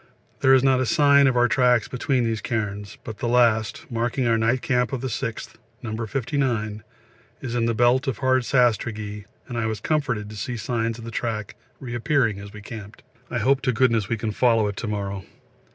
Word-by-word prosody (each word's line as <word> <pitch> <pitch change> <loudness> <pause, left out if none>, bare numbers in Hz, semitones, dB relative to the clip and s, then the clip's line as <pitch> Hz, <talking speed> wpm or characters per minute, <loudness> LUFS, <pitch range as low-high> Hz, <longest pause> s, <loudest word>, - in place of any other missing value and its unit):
There 135 0 +6
is 130 - +3
not 135 -1 +4
a - - +1
sign 140 0 +5
of 130 -2 +1
our 120 0 +5
tracks 125 -3 +3
between 125 0 0
these 115 -2 -1
cairns, 105 -3 -3
but 110 -2 -8
the - - -2
last, 115 +1 +2
marking 120 +2 -1
our 115 -1 +3
night 115 +3 +1
camp 125 -3 +1
of 130 - -2
the 130 - -2
6th, 115 0 -5 0.3
No. 110 -2 -4
59, 115 -4 -1 0.6
is 120 -3 -5
in 120 -1 +1
the 115 - 0
belt 120 +4 +3
of 130 -6 -1
hard 130 -1 +2
sastrugi, 110 -4 0 0.2
and 120 -1 -4
I 110 - 0
was 110 -2 -3
comforted 125 -6 -1
to - - -9
see 120 +4 -4
signs 115 0 -2
of 115 - -10
the 115 - -6
track 110 -2 -3 0.2
reappearing 120 -3 0
as 100 0 -9
we 105 0 -11
camped. 105 -1 -10 0.3
I - - -2
hope 135 +4 +2
to 125 - +1
goodness 115 -4 +2
we 115 - 0
can 110 0 -2
follow 115 -1 +3
it 100 - -4
to 120 - -4
morrow. 100 -2 -3
115 Hz, 205 wpm, -24 LUFS, 110-125 Hz, 0.6 s, There